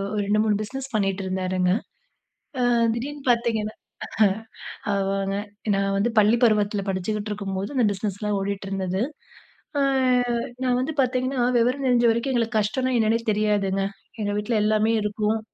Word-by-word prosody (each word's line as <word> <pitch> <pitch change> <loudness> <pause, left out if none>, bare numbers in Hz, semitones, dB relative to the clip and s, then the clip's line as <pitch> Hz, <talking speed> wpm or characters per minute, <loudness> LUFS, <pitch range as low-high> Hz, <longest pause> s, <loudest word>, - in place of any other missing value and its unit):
ஒரு 205 - +1
2,3 210 +1 +2
பிஸ்னஸ் 270 +5 -6
பண்ணிட்டுருந்தாருங்க. 185 -2 0 0.9
அ. - - +2 0.3
திடீர்னு 280 +4 -5
பார்த்திங்கன்னா 225 -2 +1 1.2
ஆமாங்க. 195 0 -1 0.4
நான் 195 0 0
வந்து 230 +4 +1
பள்ளி 215 +3 +4
பருவத்தில 210 -2 +2
படிச்சுகிட்டுருக்கும்போது 205 +2 -3
அந்த 245 - +4
பிஸ்னஸ் 200 0 -4
லா 210 - 0
ஓடிட்டிருந்தது. 195 -1 -2 0.8
அ. - - +3 0.8
நான் 250 0 +2
வந்து 295 +5 -2
பார்த்தீங்கன்னா 255 0 0 0.2
விவரம் 255 +3 +1
தெரிஞ்ச 240 -1 +4
வரைக்கும் 235 +4 -1
எங்களுக்கு 230 -1 +1
கஷ்டம்னா 255 +5 0
என்னன்னா 225 +1 +2
தெரியாதுங்க. 205 -2 +1 0.4
எங்க 205 -1 -1
வீட்ல 210 +3 -1
எல்லாமே 215 +1 +2
இருக்கும். 210 +1 0
210 Hz, 125 wpm, -24 LUFS, 195-235 Hz, 1.2 s, பள்ளி